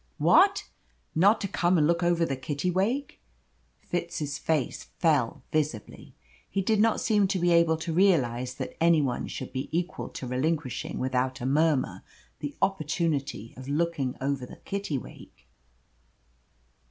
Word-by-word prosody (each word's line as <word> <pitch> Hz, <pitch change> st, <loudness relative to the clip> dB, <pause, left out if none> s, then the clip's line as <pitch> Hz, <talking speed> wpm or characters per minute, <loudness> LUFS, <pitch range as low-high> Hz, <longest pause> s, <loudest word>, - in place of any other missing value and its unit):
"What! 395 Hz, +1 st, +4 dB, 0.5 s
Not 200 Hz, +7 st, +4 dB
to 200 Hz, -, -1 dB
come 180 Hz, -1 st, +2 dB
and 150 Hz, -, +4 dB
look 170 Hz, +2 st, +2 dB
over 175 Hz, -1 st, +2 dB
the 135 Hz, -, -2 dB
Kittiwake?" 180 Hz, -, -1 dB, 0.6 s
Fitz's 165 Hz, -4 st, -3 dB
face 155 Hz, -6 st, -1 dB
fell 140 Hz, -5 st, +1 dB
visibly. 150 Hz, -9 st, -3 dB, 0.3 s
He 195 Hz, -, -1 dB
did 215 Hz, +2 st, +2 dB
not 225 Hz, +1 st, +3 dB
seem 210 Hz, -3 st, +2 dB
to 190 Hz, -, 0 dB
be 175 Hz, 0 st, +2 dB
able 170 Hz, -1 st, +4 dB
to 160 Hz, +1 st, -4 dB
realise 130 Hz, -9 st, +2 dB
that -, -, -6 dB
any 165 Hz, -1 st, +5 dB
one 130 Hz, -4 st, -1 dB
should -, -, -6 dB
be 130 Hz, +1 st, -3 dB
equal 175 Hz, +3 st, -2 dB
to -, -, -7 dB
relinquishing 130 Hz, +2 st, -2 dB
without 130 Hz, 0 st, -1 dB
a 120 Hz, -, -4 dB
murmur 150 Hz, 0 st, +1 dB, 0.4 s
the 145 Hz, -1 st, -5 dB
opportunity 155 Hz, -, -1 dB
of 130 Hz, +2 st, -9 dB
looking 150 Hz, -4 st, 0 dB
over 135 Hz, -1 st, -1 dB
the 125 Hz, -, -9 dB
Kittiwake. 195 Hz, -10 st, -6 dB
160 Hz, 140 wpm, -27 LUFS, 135-175 Hz, 0.6 s, any